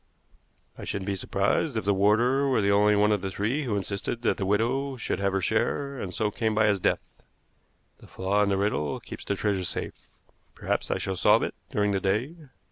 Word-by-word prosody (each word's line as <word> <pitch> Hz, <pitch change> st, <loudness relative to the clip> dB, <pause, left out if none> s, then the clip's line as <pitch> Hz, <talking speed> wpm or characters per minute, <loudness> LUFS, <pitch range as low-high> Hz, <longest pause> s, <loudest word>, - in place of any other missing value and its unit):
I -, -, -7 dB
shouldn't 100 Hz, -2 st, -4 dB
be 100 Hz, 0 st, -1 dB
surprised 100 Hz, -, 0 dB
if 110 Hz, -, -2 dB
the 100 Hz, -, +3 dB
warder 115 Hz, +8 st, +3 dB
were 130 Hz, -4 st, +2 dB
the 100 Hz, 0 st, +2 dB
only 105 Hz, +1 st, +4 dB
one 105 Hz, +1 st, +3 dB
of 105 Hz, -3 st, +1 dB
the 95 Hz, -, -3 dB
three 115 Hz, +10 st, -1 dB
who 115 Hz, -5 st, -1 dB
insisted 100 Hz, +4 st, -3 dB
that -, -, +1 dB
the 95 Hz, -, -2 dB
widow 130 Hz, +7 st, 0 dB
should 120 Hz, -, -2 dB
have 100 Hz, 0 st, +1 dB
her 95 Hz, 0 st, 0 dB
share, 140 Hz, +9 st, -1 dB
and 95 Hz, -, -4 dB
so 105 Hz, +3 st, -1 dB
came 110 Hz, 0 st, -1 dB
by 110 Hz, 0 st, +4 dB
his 100 Hz, -2 st, +2 dB
death. -, -, -2 dB, 0.8 s
The -, -, -15 dB
flaw 100 Hz, +2 st, 0 dB
in 105 Hz, -, +2 dB
the 100 Hz, -, +1 dB
riddle 95 Hz, -8 st, -1 dB
keeps -, -, -9 dB
the 100 Hz, -, -2 dB
treasure 100 Hz, -2 st, -1 dB
safe. 85 Hz, -, -5 dB, 0.5 s
Perhaps -, -, -2 dB
I -, -, 0 dB
shall 95 Hz, -, -3 dB
solve -, -, +4 dB
it -, -, -2 dB, 0.2 s
during 105 Hz, 0 st, +1 dB
the 100 Hz, -, +1 dB
day. 105 Hz, +10 st, 0 dB
105 Hz, 215 wpm, -27 LUFS, 100-115 Hz, 0.8 s, only